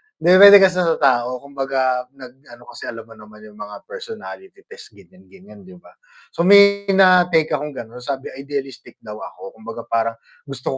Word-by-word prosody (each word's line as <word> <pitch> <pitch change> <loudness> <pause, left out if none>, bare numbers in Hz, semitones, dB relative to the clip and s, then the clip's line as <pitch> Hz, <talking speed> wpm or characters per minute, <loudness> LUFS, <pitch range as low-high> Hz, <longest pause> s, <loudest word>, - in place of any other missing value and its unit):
Depende 195 +2 +7
kasi 185 -1 +2
sa 165 -2 +1
tao, 125 -2 -1
kumbaga 135 -2 -3
nag 130 -1 -15
ano 120 0 -16
kasi - - -11
alam 115 -1 -8
mo 115 - -22
naman 105 0 -17
'yung 105 0 -17
mga 105 0 -11
personality 450 -5 -11
test 460 +1 -15
ganiyan-ganiyan, 190 +2 -19
'di 185 - -15
ba? - - -21 0.4
So - - -4
may 200 0 +5
na-take 180 -4 +3
akong 150 0 -5
gano'n 120 0 -10
sabi 135 +1 -6
idealistic 135 -3 -8
daw 105 0 -10
ako. 95 - -11
Kumbaga 115 +1 -9
parang 115 0 -2 0.3
gusto 135 -2 -6
140 Hz, 165 wpm, -18 LUFS, 120-185 Hz, 0.4 s, Depende